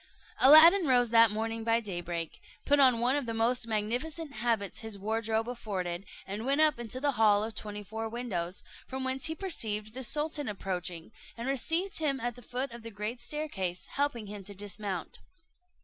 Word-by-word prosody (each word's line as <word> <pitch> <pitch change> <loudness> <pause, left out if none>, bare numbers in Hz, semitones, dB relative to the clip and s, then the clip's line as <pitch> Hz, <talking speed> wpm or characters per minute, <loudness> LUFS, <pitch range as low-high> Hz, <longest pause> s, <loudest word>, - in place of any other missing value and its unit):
Aladdin 320 +5 +8
rose 245 -3 +3
that 230 -1 +7
morning 225 +2 -3
by 230 0 +3
daybreak, 175 -6 -5 0.2
put 290 0 +4
on 255 -4 +5
one 245 +3 +2
of 285 -4 -2
the 230 - -2
most 235 +1 +1
magnificent 250 +9 -2
habits 220 -3 -1
his 220 -3 -4
wardrobe 220 +2 -1
afforded, 195 -6 -4 0.2
and 205 +3 -5
went 275 +4 +1
up 305 -5 +4
into 240 +2 -5
the 285 +1 +2
hall 215 -4 +4
of 225 +1 -4
twenty 210 -1 -5
four 220 +2 -5
windows, 200 -7 -3 0.2
from 265 0 -4
whence 260 0 +1
he 320 - -3
perceived 215 - -2
the 260 - -6
sultan 295 +2 0
approaching, 180 -3 -4 0.3
and 235 +2 -4
received 325 - +1
him 280 -4 0
at 240 +1 -2
the 245 - -12
foot 250 +3 -4
of 235 0 -9
the 230 - -8
great 215 +3 -5
staircase, 240 - -3
helping 280 -6 -1
him 205 -1 -8
to 200 +1 -8
dismount. 200 -2 -5
230 Hz, 180 wpm, -30 LUFS, 210-265 Hz, 0.3 s, Aladdin